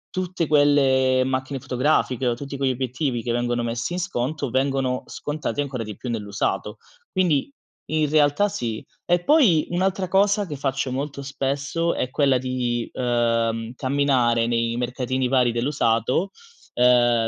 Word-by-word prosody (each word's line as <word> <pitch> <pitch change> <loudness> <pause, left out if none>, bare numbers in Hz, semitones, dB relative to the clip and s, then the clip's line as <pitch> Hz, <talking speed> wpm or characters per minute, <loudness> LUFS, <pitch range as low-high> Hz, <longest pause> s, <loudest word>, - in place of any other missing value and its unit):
tutte 180 -3 -2
quelle 135 -3 +4
macchine 130 +1 -2
fotografiche 130 0 0
o 120 - +1
tutti 140 +3 -7
quegli 135 -1 0
obiettivi 130 0 -2
che 115 +1 -2
vengono 120 0 -1
messi 115 +4 -3
in 180 - -2
sconto, 140 -3 -2
vengono 130 0 0
scontati 150 0 -4
ancora 135 -5 -2
di 105 -2 -8
più 125 - -6
nell'usato. 105 -3 -2 0.3
Quindi, 175 - +1 0.4
in 155 -2 +1
realtà, 150 +5 +3
sì. 115 - -4 0.2
E 175 0 +2
poi, 240 - +4
un'altra 185 +1 0
cosa 200 +2 +2
che 150 - -5
faccio 135 -1 -2
molto 140 +1 -4
spesso, 140 +4 -2
è 125 - -2
quella 135 -2 +3
di, 125 -2 -2
uhm, 115 -2 0
camminare 130 -4 +1
nei 115 0 0
mercatini 125 +1 -1
vari 125 -2 +3
dell'usato, 120 - 0 0.4
ehm 120 -2 +4
130 Hz, 140 wpm, -23 LUFS, 120-145 Hz, 0.4 s, quelle